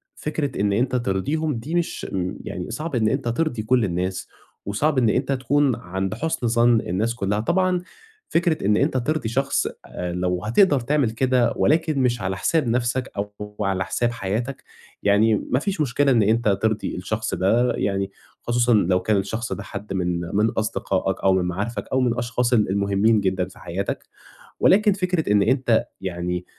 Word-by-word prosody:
فكرة 145 -6 -3
إن 100 0 +2
أنت 125 +5 +1
ترضيهم 130 +8 -1
دي 135 +9 -4
مش، 175 -1 -2 0.4
يعني - - -5
صعب 155 -2 -4
إن 110 -3 +2
أنت 135 +1 -2
ترضي 120 -1 -1
كل 125 +1 +2
الناس، 90 +1 -2 0.4
وصعب 135 +9 0
إن 120 -4 +4
أنت 130 +5 0
تكُون 135 0 +2
عند 95 +1 -4
حُسن 130 0 -2
ظَن 115 0 +4
الناس 110 +7 -1
كلّها. 105 -2 -1
طبعًا 180 - +1 0.5
فكرة 165 - +1
إن 105 +1 +3
أنت 140 -1 +1
ترضي 130 -1 -1
شخص، 135 +4 0 0.2
آآ، 90 0 -5
لو 90 0 -1
هتقدَر 145 - +4
تعمل 130 -1 +1
كده، 125 +1 +2
ولكن 155 -1 +2
مش 120 -2 +1
على 95 0 -2
حساب 155 - +1
نَفْسك 120 +2 0
أو 105 +1 -3 0.3
على 95 -2 0
حساب 120 +3 0
حياتك، 115 +5 -3 0.4
يعني 105 +2 +4 0.2
ما 125 - +3
فيش 190 +2 -2
مشكلة 140 0 +2
إن 115 -4 +4
أنت 110 +3 +2
ترضي 110 -1 0
الشخص 110 +5 -2
ده، 115 +7 +2
يعني 100 -1 -1 0.3
خصوصًا 120 0 +2
لو 95 -3 +3
كان 105 +2 +1
الشخص 110 +2 -2
ده 100 +2 -6
حد 105 +1 -7
من 90 -2 -1
من 105 +2 +3
أصدقاءك 100 -4 -1
أو 95 - +5
من 95 -1 +1
معارفك 100 +7 -3
أو 130 - +2
من 125 -2 +2
الأشخاص 120 +1 -1
ال 110 -5 +3
المهمّين 100 +2 +2
جدًا 95 -1 0
في 95 - -16
حياتك، - - -4 0.5
ولكن 210 +2 +5
فكرة 180 - 0
إن 105 -1 +4
أنت 120 0 +2 0.2
يعني 90 -1 -3
115 Hz, 175 wpm, -23 LUFS, 100-130 Hz, 0.5 s, أو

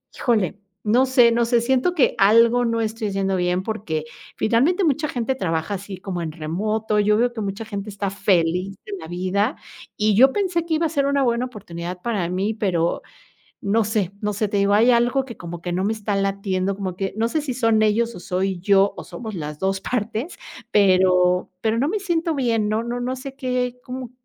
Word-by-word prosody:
híjole, 210 -5 0 0.3
no 240 +5 +4
sé 250 -3 +5
no 235 0 +2
sé, 235 0 +2
siento 265 +8 +1
que 280 - +3
algo 230 +4 +5
no 230 0 0
estoy 220 0 -2
haciendo 195 0 0
bien 180 +1 0
porque, 190 -8 -3 0.3
finalmente, 275 - +2
mucha 305 -1 +1
gente 250 +2 -1
trabaja 165 -4 -2
así 195 0 -7
como 180 -1 -5
en 160 -2 -3
remoto. 210 +7 -1
Yo 210 +1 +3
veo 240 +1 +1
que 225 - -5
mucha 200 +2 -4
gente 200 -1 -5
está 200 -1 -3
feliz 185 -1 +1
de 210 - -7
la 160 - -9
vida 185 - -1 0.4
y 210 -1 +2
yo 265 +4 +6
pensé 360 -4 0
que 325 - 0
iba 325 +2 +1
a - - -6
ser 285 -3 0
una 280 0 +2
buena 240 0 +1
oportunidad 180 -6 -7
para 200 -5 -1
mí, 190 +4 -1
pero 180 -6 0 0.6
no 215 +2 +2
sé 200 -3 -1
no 210 0 0
sé, 210 +1 -1
te 205 - -2
digo, 200 0 +2
hay 230 +4 +5
algo 245 +3 +2
que 235 -6 -9
como 170 0 -7
que 175 - -3
no 185 +2 0
me 215 - +1
está 210 -2 -2
latiendo, 195 -1 -1
como 185 -3 -4
que 195 0 -2
no 225 +1 +1
sé 310 +5 -1
si 275 -3 -3
son 225 -3 +2
ellos 230 +2 +1
o - - -9
soy 185 +1 -2
yo 195 +1 +3
o - - -7
somos 220 -3 -7
las 150 -3 -5
2 190 0 -1
partes, 230 - -3 0.3
pero 185 -2 +3
pero 225 0 +1
no 275 +5 +1
me 425 - -1
siento 335 -4 0
bien. 230 -6 +1
No 215 +1 0
no 240 +1 -4
no 255 +1 -2
sé 270 +1 -8
qué, 250 -1 -2
¿cómo 255 -1 -6
215 Hz, 215 wpm, -22 LUFS, 190-245 Hz, 0.6 s, yo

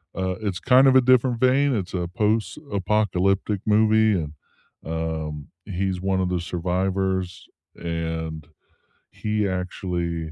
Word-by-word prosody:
uh 95 -1 -1
it's 100 -4 -2
kind 130 +1 +5
of 130 - +5
a 130 - +8
different 125 -1 +3
vein. 130 +1 +3
It's 95 -3 -4
a 90 -1 -2
post-apocalyptic 105 - 0
movie 110 0 +4
and, 75 0 -6 0.5
um, 80 -2 -4 0.2
he's 95 -1 -2
one 95 -1 0
of 90 - 0
the 90 -1 0
survivors, 90 +1 -2 0.3
and 80 -2 -4 0.6
he 105 -1 -1
actually 90 -3 -3
95 Hz, 120 wpm, -24 LUFS, 85-110 Hz, 0.6 s, a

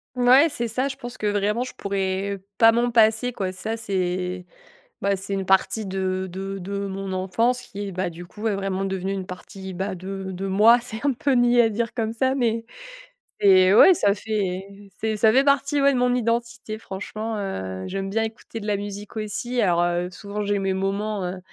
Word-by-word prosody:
Mouais, 255 +5 +6
c'est 235 -5 -3
ça. 255 +5 0
Je 270 - -5
pense 245 -2 -8
que 210 - -2
vraiment, 205 +3 +1
je - - -8
pourrais 195 0 -2 0.2
pas 225 0 +7
m'en 240 +1 +1
passer 225 +1 +3
quoi. 190 -4 -2
Ça 215 +5 -4
c'est 185 -3 -2 0.6
bah 200 0 +2
c'est 195 +1 -6
une 195 -1 -2
partie 190 +2 +2
de 190 0 -2
de 195 +2 -5
de 200 +2 -4
mon 195 0 -5
enfance 225 +7 +1
qui 205 -5 -7
est, - - -5
bah 185 0 -1
du 175 +1 -10
coup 210 +4 -14
ouais, 220 -3 0
vraiment 195 -1 -2
devenue 190 0 -2
une 190 -1 -4
partie 190 +1 -9
bah, 190 +1 -3
de 190 +1 -6
de 195 +2 -4
moi. 220 +5 +6
C'est 235 +2 -6
un 275 - +3
peu 275 +4 -1
niais 245 -1 +5
à 225 - +3
dire 230 +2 -2
comme 225 -2 -1
ça 260 +3 +1
mais 230 -3 0 0.8
mais 190 -1 +6
ouais 375 - +9
ça 200 -9 +2
fait 195 -3 -2 0.4
c'est 220 -1 -1
ça 220 +1 +4
fait 270 - +5
partie 280 0 +2
ouais, 280 0 +5
de - - +1
mon 250 0 +2
identité. 235 -2 -2
Franchement, 215 +2 -5
heu, 95 - -4
j'aime 195 0 -3
bien 220 +3 0
écouter 225 0 -6
de 210 - -7
la 205 - +2
musique 205 +1 -7
aussi. 235 +3 -2
Alors, 175 -3 +3
heu, 175 +1 0
souvent, 205 +2 -5
j'ai 205 -1 0
mes 190 -1 0
moments, 200 +1 -2
heu 185 +1 -5
205 Hz, 210 wpm, -24 LUFS, 190-230 Hz, 0.8 s, ouais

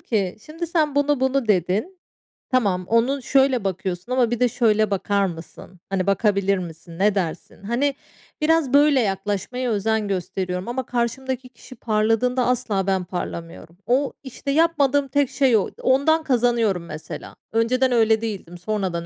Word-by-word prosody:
ki 195 -6 -1
"Şimdi 330 +3 -5
sen, 310 -4 0
'bunu 285 -1 +2
bunu.' 265 -3 +1
dedin. 205 - 0 0.5
Tamam, 200 -8 +1
onu 245 +5 +2
şöyle 265 -2 +2
bakıyorsun 190 +2 -3
ama 245 -2 +2
bir 240 - -1
de 250 -1 +3
şöyle 215 -3 +2
bakar 200 +1 +1
mısın? 175 +1 -9
Hani, 190 -1 -1
bakabilir 200 -1 +2
misin, 170 -1 -9
ne 205 +1 +3
dersin?" 180 0 -4
Hani, 260 +7 0 0.5
biraz 305 -4 +2
böyle 285 -1 +5
yaklaşmaya 205 +5 -2
özen 220 0 0
gösteriyorum. 185 0 -3
Ama 250 +1 -3
karşımdaki 255 +2 -2
kişi 255 - -14
parladığında 225 +3 +1
asla 220 -6 0
ben 190 -1 +1
parlamıyorum. 170 -1 -7
O, 265 +3 +1
işte, 270 +1 -5
yapmadığım 285 -3 +2
tek 285 0 +1
şey 260 -5 +3
o. 200 - -1
Ondan 295 +5 +3
kazanıyorum 235 - +1
mesela. 155 -1 -8 0.2
Önceden 250 +3 +2
öyle 220 -2 +3
değildim. 200 -6 -5
Sonradan 180 -3 -2
225 Hz, 150 wpm, -22 LUFS, 195-260 Hz, 0.5 s, böyle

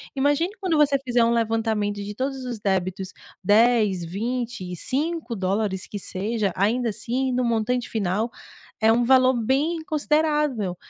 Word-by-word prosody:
Imagine 290 +6 +2
quando 365 -5 0
você 285 -2 +4
fizer 245 -1 +3
um 230 - +3
levantamento 220 -3 0
de 205 +1 -6
todos 265 +2 -3
os 240 -4 -5
débitos, 190 -1 -2 0.3
$10, 210 -3 +3
$20, 220 0 -4
$5 220 - -2
que 205 - -6
seja, 205 +2 -2
ainda 230 +5 +1
assim 255 +5 -2
no 250 0 0
montante 235 +1 0
final, 215 +2 -1 0.5
é 220 - +5
um 240 +2 +3
valor 255 +1 +5
bem 285 +8 0
considerável, 300 - 0
235 Hz, 140 wpm, -24 LUFS, 205-265 Hz, 0.5 s, é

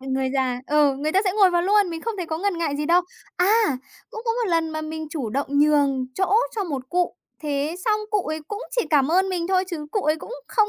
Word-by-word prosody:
ờ, 265 - -11
người 265 0 0
già 255 -2 0
ừ, 295 -2 +3
người 300 +3 -2
ta 385 - +4
sẽ 375 - +1
ngồi 395 -2 +5
vào 345 -1 +2
luôn, 400 -1 +3
mình 330 -1 -5
không 460 -2 -3
thấy 360 -3 -4
có 315 0 -3
ngần 390 -1 -1
ngại 310 -4 -1
gì 295 +1 -2
đâu. 350 +2 +4 0.3
A! 405 - +3 0.3
Cũng 445 - -7
có 455 - +1
một 470 -2 -1
lần 330 -1 +1
mà 310 0 -3
mình 315 0 -5
chủ 280 -9 -3
động 275 +5 -1
nhường 285 -3 +3
chỗ 380 +1 +1 0.2
cho 410 - 0
một 275 -7 -5
cụ, 355 +2 0 0.3
thế 295 +2 -1
xong 430 -1 +2
cụ 420 -1 +2
ấy 310 +1 -3
cũng 415 0 -5
chỉ 485 - +1
cảm 285 -3 +4
ơn 375 +3 +3
mình 355 -3 -2
thôi, 375 0 +2
chứ 305 -4 -5
cụ 415 - 0
ấy 310 +1 +2
cũng 385 - -9 0.2
không 430 -2 +2
330 Hz, 265 wpm, -23 LUFS, 295-385 Hz, 0.3 s, ngồi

